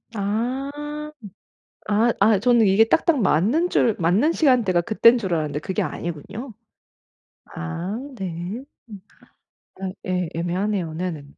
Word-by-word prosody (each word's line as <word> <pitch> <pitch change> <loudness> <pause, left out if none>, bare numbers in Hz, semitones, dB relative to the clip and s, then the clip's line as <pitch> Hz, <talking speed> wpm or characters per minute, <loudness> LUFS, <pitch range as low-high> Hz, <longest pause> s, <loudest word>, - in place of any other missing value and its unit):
아. 235 +7 -2 1.2
아 225 +3 +3
아 210 0 +5
저는 235 +1 +4
이게 195 +3 +5
딱딱 300 +4 +2
맞는 225 - +2
줄 225 -4 +2
맞는 190 - +2
시간대가 245 - +3
그때인 230 +5 +5
줄 190 -6 -3
알았는데 150 -2 -2
그게 185 +3 -3
아니군요? 175 - -6 0.9
아 170 - -5 0.2
네. 185 +3 -5 0.3
음. 205 -3 -10 0.8
아 190 - -2 0.2
예. 180 -2 -1
애매하네요. 175 0 -2
네네. 165 -3 -4
200 Hz, 230 characters per minute, -23 LUFS, 175-235 Hz, 1.2 s, 아